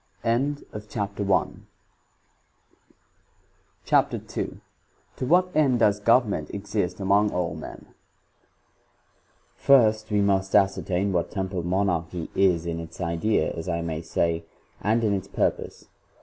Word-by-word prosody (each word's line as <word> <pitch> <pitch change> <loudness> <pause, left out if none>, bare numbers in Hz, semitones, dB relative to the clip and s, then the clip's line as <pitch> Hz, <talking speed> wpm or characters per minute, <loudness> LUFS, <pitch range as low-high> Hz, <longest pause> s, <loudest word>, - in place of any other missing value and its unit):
* - - -38
CHAPTER 110 -5 -2
II 95 -2 0 2.2
7"f 130 - -3
what 180 +4 +3
end 140 -5 +3
does 105 -3 +3
government 115 0 +2
exist 100 -2 -3
among 100 +2 +3
all 85 -3 -1
men? 80 - -9
I. - - -27 1.7
First, 110 -5 +4
we 105 -1 +2
must 95 -1 +1
ascertain 95 0 +2
what 85 -1 0
temporal 95 -2 -3
Monarchy 90 -2 -1
is 90 -4 +2
in 85 -1 -3
its 85 0 -9
idea, 85 +4 0
as 85 +2 -6
I 85 -1 -1
may 80 -1 -3
say, 85 0 -1 0.4
and 115 +2 +1
in 105 -2 +2
its 95 -2 -3
purpose. - - -2
100 Hz, 120 wpm, -25 LUFS, 85-110 Hz, 2.2 s, First